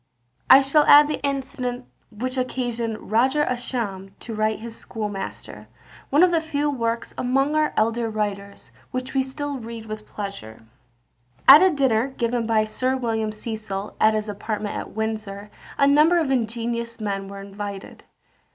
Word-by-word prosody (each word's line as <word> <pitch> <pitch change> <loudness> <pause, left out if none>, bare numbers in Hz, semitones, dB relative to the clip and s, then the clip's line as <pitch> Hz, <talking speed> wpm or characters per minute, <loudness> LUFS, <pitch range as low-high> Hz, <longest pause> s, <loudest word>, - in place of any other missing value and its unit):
I 270 - +10
shall 275 +3 +4
add 295 0 +8
the 300 - -3
incident 260 -3 -3 0.2
which 255 +4 -4
occasioned 240 -4 -3
Roger 260 +7 +3
Ascham 215 -7 -3
to 230 - -6
write 215 0 0
his 230 +1 -8
Schoolmaster, 210 -5 -6 0.4
one 295 +5 +5
of 365 - +5
the 330 -1 +2
few 295 -2 -1
works 230 -3 -2
among 270 +4 +1
our 310 0 +2
elder 230 +1 +1
writers, 200 -2 -4 0.2
which 255 +1 -5
we 270 - +2
still 280 +1 -4
read 230 -1 -8
with 215 -1 -7
pleasure. 195 - -7 0.8
At 280 +3 +11
a 375 - +6
dinner 265 -7 +2
given 240 -3 -2
by 220 -1 +3
Sir 255 +5 -1
William 225 -3 -1
Cecil, 215 -2 -5
at 215 0 +5
his 215 0 -2
apartments 210 0 -4
at - - -7
Windsor, 215 -2 -4 0.3
a 280 - +4
number 300 +5 +5
of 315 -5 +1
ingenious 235 -1 -2
men 200 -2 -3
were 200 0 -8
invited. 200 0 -8
230 Hz, 155 wpm, -23 LUFS, 215-265 Hz, 0.8 s, At